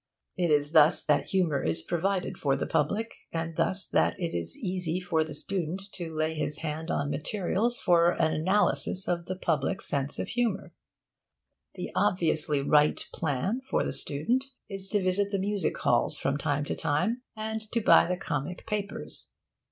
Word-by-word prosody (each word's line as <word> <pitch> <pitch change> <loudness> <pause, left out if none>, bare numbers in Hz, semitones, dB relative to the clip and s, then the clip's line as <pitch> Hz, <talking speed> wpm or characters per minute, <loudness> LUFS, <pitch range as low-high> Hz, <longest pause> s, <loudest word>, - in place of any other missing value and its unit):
It 175 -2 0
is 145 -1 +3
thus 155 -1 +5
that 150 -2 +2
humour 175 -7 +1
is 80 0 -1
provided 185 +2 -1
for 140 -2 0
the 135 - -2
public, 200 +9 0 0.2
and 165 0 -3
thus 190 +4 +1
that - - +1
it 170 -2 -2
is 85 -1 -3
easy 180 -2 -1
for 170 -3 0
the 155 -2 -5
student 185 +2 -1
to 170 -3 -6
lay 155 0 -1
his 155 -1 -1
hand 160 +1 -4
on 145 0 -1
materials 200 +9 -1
for 170 -2 +4
an 160 -1 +1
analysis 185 +3 +1
of 170 -1 -1
the 185 - -3
public's 175 +1 -1
sense 140 -1 0
of - - -3
humour. 235 -5 -1 1.0
The - - -5
obviously 160 -7 +3
right 150 +1 +4
plan 165 - -1
for - - +1
the - - -3
student 230 - 0 0.2
is 195 -1 -2
to 205 -1 +1
visit 190 +2 +3
the 200 - -1
music 195 -3 -1
halls - - +1
from 135 - -1
time 145 0 -1
to - - -2
time, 225 +12 0
and 220 0 -3
to 235 - +1
buy 215 - +6
the 180 0 -1
comic 170 0 -4
papers. 210 -3 -4
170 Hz, 175 wpm, -28 LUFS, 150-195 Hz, 1.0 s, buy